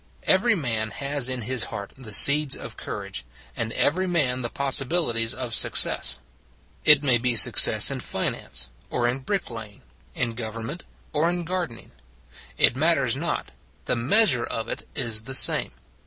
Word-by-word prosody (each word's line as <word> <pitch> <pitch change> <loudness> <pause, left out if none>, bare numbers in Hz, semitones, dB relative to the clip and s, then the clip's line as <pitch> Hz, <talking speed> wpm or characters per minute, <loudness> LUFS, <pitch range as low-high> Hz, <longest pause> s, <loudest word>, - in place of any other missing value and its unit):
Every 210 +4 +1
man 115 - -3
has 140 +2 -3
in 130 -2 -5
his 125 +1 -1
heart 100 -1 -9
the 130 -5 -12
seeds 140 +5 +6
of - - -10
courage; 65 - -8 0.3
and 110 0 -5
every 185 +5 -1
man 140 -8 -1
the 120 - -5
possibilities 135 -4 0
of 125 -2 -6
success. 60 - +3 0.7
It 150 -1 +6
may 125 -4 +1
be 120 0 -1
success 110 - +7
in - - -5
finance 65 -1 -4 0.2
or 120 -1 -2
in 125 +2 -3
brick 190 +3 -5
laying; 110 - -11 0.3
in 120 -3 -3
government 115 +7 -8 0.3
or 155 +3 0
in 175 0 -4
gardening. 175 -9 -7 0.7
It - - +2
matters 140 -4 0
not: 170 +5 -5 0.3
the - - -2
measure 135 - +2
of 115 0 -6
it - - -8
is 110 -3 -2
the 135 - -4
same. - - +3
130 Hz, 155 wpm, -22 LUFS, 115-150 Hz, 0.7 s, success